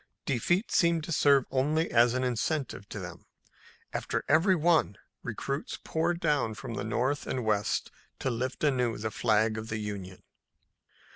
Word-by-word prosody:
Defeat 175 - 0
seemed 170 -2 +3
to 165 - -6
serve 140 -4 +4
only 150 +5 +1
as 120 +1 +4
an 130 - 0
incentive 125 -3 -2
to - - -6
them. - - -8 0.7
After - - -2
every 170 +6 +4
one, 160 - +2 0.2
recruits 135 +5 -4
poured 170 +2 0
down 145 -9 +1
from 115 - -7
the 100 - -3
north 125 +6 -1
and 125 -3 -2
west 105 -2 0 0.3
to 130 - -1
lift 125 +4 -3
anew 125 -6 +1
the 110 +1 -3
flag 110 0 +2
of 110 +1 -7
the 110 - -2
Union. 100 -3 -6
125 Hz, 155 wpm, -29 LUFS, 110-155 Hz, 0.7 s, serve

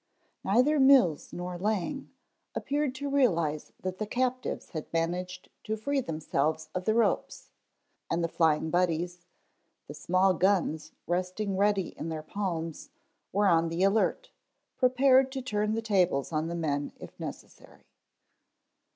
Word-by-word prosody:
Neither 255 +9 +3
Mills 265 - +5
nor 180 0 -5
Lang 215 - -2 0.5
appeared 285 -2 -1
to 285 +2 -4
realize 170 - +1
that 185 0 -4
the 215 - -2
captives 255 +2 -2
had 155 -4 -6
managed 180 +2 -2 0.2
to 220 +1 -2
free 275 +5 0
themselves 160 - -2
of 185 0 -3
the 220 - +2
ropes, 235 - 0 0.6
and 170 - 0
the - - +2
Flying 160 -1 +1
Buddies, 175 0 0 0.6
the - - -7
small 185 +1 +2
guns 180 -4 +1
resting 185 +3 -2
ready 200 -1 +2
in 165 - -5
their 155 -1 -4
palms, 165 -3 -4 0.4
were 205 +2 +2
on 165 -2 +3
the 170 +3 -1
alert, 195 +3 +1 0.4
prepared 260 +1 +4
to 265 - -3
turn 215 -3 0
the 225 - -2
tables 180 -11 +1
on 155 0 -1
the 170 - -4
men 145 -4 -2
if - - -12
necessary. - - -10
185 Hz, 140 wpm, -29 LUFS, 165-225 Hz, 0.6 s, Mills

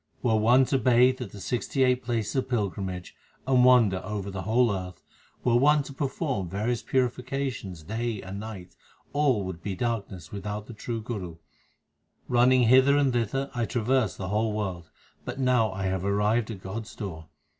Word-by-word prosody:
Were 115 -3 +3
one 120 +5 +5
to 135 +1 +1
bathe 125 +1 +4
at 125 - -4
the 105 - -11
sixty 125 +5 -1
eight 125 0 +3
places 115 -3 -2
of 130 -1 -1
pilgrimage 95 -5 -3 0.3
and 130 -1 +4
wander 115 -7 +5
over 100 -1 -4
the 95 0 -4
whole 115 +4 +2
earth, 90 -1 -7 0.4
Were 120 -1 +3
one 145 +3 +4
to 140 - -9
perform 135 - -2
various 110 +6 -1
purifications 125 - -2
day 110 +3 -3
and 95 +1 -7
night, 100 -5 -8 0.4
all 140 -8 +2
would 95 -3 -6
be 100 +1 -4
darkness 100 -7 -3
without 105 +1 -5
the 120 - -10
true 115 +1 -4
Guru. 95 -8 -5 0.9
Running 125 +1 +4
hither 130 +4 +6
and 140 -3 +2
thither, 120 +4 -1
I 120 -2 -1
traversed 120 -2 0
the 95 -1 -4
whole 105 +1 0
world, 95 -6 -4 0.3
but - - -6
now 125 -5 +3
I 95 +1 -4
have 95 -1 -1
arrived 105 +3 +1
at 100 -5 -7
God 105 +4 -5
s 120 - -12
door. 80 -7 -7
115 Hz, 175 wpm, -27 LUFS, 100-125 Hz, 0.9 s, hither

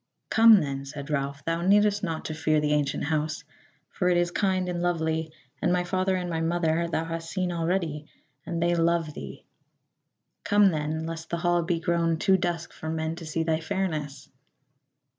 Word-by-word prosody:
"Come 225 -3 +7
then," 140 -1 -3
said 140 +1 -7
Ralph, 140 0 -2
"thou 165 +1 -1
needest 205 +2 +3
not 165 -5 -3
to 155 - -3
fear 155 0 +1
the 150 0 +1
ancient 145 -2 0
house, 155 0 -1 0.5
for 180 -2 0
it 175 - +3
is 175 0 +1
kind 185 -1 0
and 175 -1 -2
lovely, 160 -2 -1 0.3
and 175 - +2
my 180 0 +2
father 185 +1 0
and 180 -1 -2
my 165 -2 -2
mother 165 0 +1
thou 165 -1 -1
hast 165 0 -5
seen 185 0 -1
already, 165 -3 -1 0.4
and 170 -1 -2
they 175 0 +2
love 165 -2 +1
thee. 70 - -9 1.0
Come 205 -1 +5
then, 155 0 -2
lest 165 0 -6
the 170 - -1
hall 175 0 +2
be 170 0 -1
grown 165 -1 +1
too 190 +4 +3
dusk 175 -2 -2
for 160 - -6
men 160 0 -2
to 165 -2 -8
see 160 +1 -1
thy 160 -1 0
fairness." 160 -5 -3
165 Hz, 185 wpm, -27 LUFS, 160-175 Hz, 1.0 s, Come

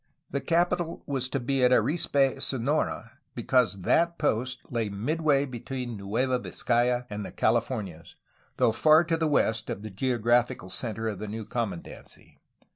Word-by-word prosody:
The 140 - -1
capital 170 +3 0
was 130 -2 -2
to 135 - -1
be 130 +1 0
at 125 - +6
Arispe, 135 +1 +2
Sonora, 130 -2 -1 0.2
because 120 -4 +1
that 170 - +2
post 125 -3 -2
lay 115 -3 -1
midway 140 +7 +1
between 125 -1 -5
Nueva 120 +6 -1
Vizcaya 120 0 0
and 105 0 -4
the - - -7
Califor 115 -1 0
nias, 80 -2 -14 0.4
though - - +4
far 155 +8 +5
to 165 0 0
the 160 -1 0
west 115 -6 +1
of 100 - -4
the 110 - -7
geographical 120 -2 +1
centre 110 +1 -3
of 105 -4 -3
the 110 - -5
new 110 +1 -5
commandancy. 105 -6 -6
125 Hz, 155 wpm, -27 LUFS, 110-140 Hz, 0.4 s, at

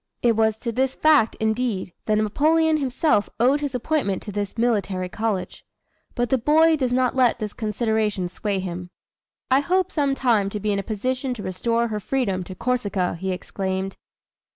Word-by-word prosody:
It 235 -2 +4
was 220 0 +2
to 235 +1 -3
this 260 +3 0
fact, 300 -8 +4
indeed, 220 -4 -1
that 215 - +3
Napoleon 310 +9 +2
himself 270 -4 +1
owed 265 +5 +3
his 285 -3 -3
appointment 250 -7 -1
to 210 - -6
this 205 +2 -4
military 200 -6 0
college. 215 -1 -3 0.5
But 240 -1 -1
the 265 - +3
boy 315 +6 +4
does 260 -5 -1
not 250 0 +1
let 255 -2 +3
this 210 -1 -5
consideration 215 -3 -1
sway 200 +3 -3
him. 180 -1 -5 0.6
"I 260 - +6
hope 365 +5 +1
some 280 -3 +1
time 225 -7 +2
to 210 - -4
be 210 +1 -1
in 200 - 0
a - - 0
position 250 +5 -2
to 210 - -7
restore 230 +5 0
her 210 -1 -2
freedom 205 -5 -1
to 185 - -8
Corsica!" 205 -6 -1
he 190 +1 -2
exclaimed. 190 +1 -3
225 Hz, 175 wpm, -23 LUFS, 200-260 Hz, 0.6 s, I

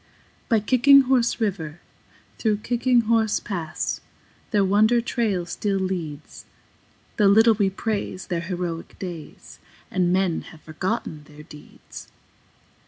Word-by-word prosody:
By 225 -3 +4
Kicking 260 +6 +6
Horse 250 -3 +1
River, 175 -7 -3 0.6
through 215 -2 +1
Kicking 245 0 +2
Horse 225 -1 +1
Pass, 170 -6 -4 0.5
Their 205 -4 +2
wonder 215 +5 +4
trail 225 -7 -1
still 195 +3 -2
leads, 170 -6 -5 0.7
Though 210 - +4
little 220 +3 +6
we 200 -2 +1
praise 200 -2 -4
their 175 -3 -2
heroic 175 -2 -5
days 175 -5 -9 0.3
And 180 -2 +1
men 185 -2 +1
have 160 - -15
forgotten 160 -2 -4
their 150 0 -14
deeds. 150 -2 -13
195 Hz, 120 wpm, -23 LUFS, 170-225 Hz, 0.7 s, Kicking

